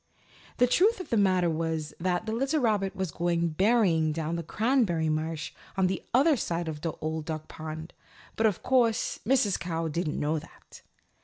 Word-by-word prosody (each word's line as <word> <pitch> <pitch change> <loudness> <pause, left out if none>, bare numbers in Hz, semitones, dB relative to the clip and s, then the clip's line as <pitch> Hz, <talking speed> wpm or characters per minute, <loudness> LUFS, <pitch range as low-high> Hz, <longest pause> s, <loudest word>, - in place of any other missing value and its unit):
The 245 - +5
truth 385 - +3
of 365 - -8
the - - +3
matter 185 -4 +3
was 160 -1 -2
that 180 +2 0
the 220 - -3
little 270 +7 0
rabbit 210 -6 +1
was 190 -4 -2
going 170 0 0
berrying 180 -3 +3
down 160 0 -3
in - - -1
the - - -2
Cranberry 190 - +1
Marsh 155 0 -2 0.3
on 190 - +3
the 185 0 -1
other 285 +5 +5
side 170 -7 -2
of 150 -2 -5
the 165 -1 -2
Old 155 0 -3
Duck 155 -2 -5
Pond, 160 +1 -7 0.4
but 225 - +3
of 205 - -2
course 240 -4 +2
Mrs. 245 -7 +3
Cow 165 -2 -2
didn't 155 0 -2
know 155 +2 0
that. - - -16
175 Hz, 185 wpm, -28 LUFS, 160-225 Hz, 0.4 s, The